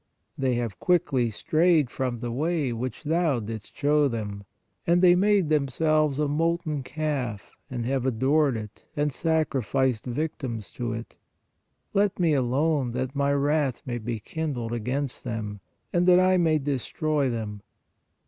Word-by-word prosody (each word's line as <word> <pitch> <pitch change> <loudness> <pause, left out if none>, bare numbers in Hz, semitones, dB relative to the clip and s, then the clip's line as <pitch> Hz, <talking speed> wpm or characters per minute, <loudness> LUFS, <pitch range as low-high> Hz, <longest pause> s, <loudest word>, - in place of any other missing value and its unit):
They 130 -2 0
have 115 -7 -3
quickly 140 -9 +2
strayed 155 - +2
from 125 -2 -2
the 120 - -3
way, 150 0 0
which 125 +5 -4
thou 160 -3 +1
didst 110 -1 -7
show 145 0 +3
them; 105 -5 -4 0.4
and 170 +1 +4
they 175 -1 +8
made 195 -2 +3
themselves 155 0 +2
a 150 0 +1
molten 155 0 0
calf, 135 -6 -3 0.2
and 120 -3 -3
have 130 0 0
adored 135 +2 +2
it 105 -1 -9
and 150 -1 +1
sacrificed 135 -6 0
victims 125 -5 -3
to 120 -2 -3
it.... 115 +1 -7 0.8
Let 200 -1 +2
Me 170 -4 +3
alone, 135 0 +1
that 130 +2 -3
My 140 0 +2
wrath 140 -2 +1
may 120 -1 -3
be 115 0 -3
kindled 125 -3 -3
against 125 +4 -2
them, 110 -4 -4 0.3
and 175 +1 +2
that 180 0 +7
I 185 0 +4
may 165 -3 +3
destroy 145 +1 -1
them." 110 -3 -4
135 Hz, 150 wpm, -26 LUFS, 120-155 Hz, 0.8 s, they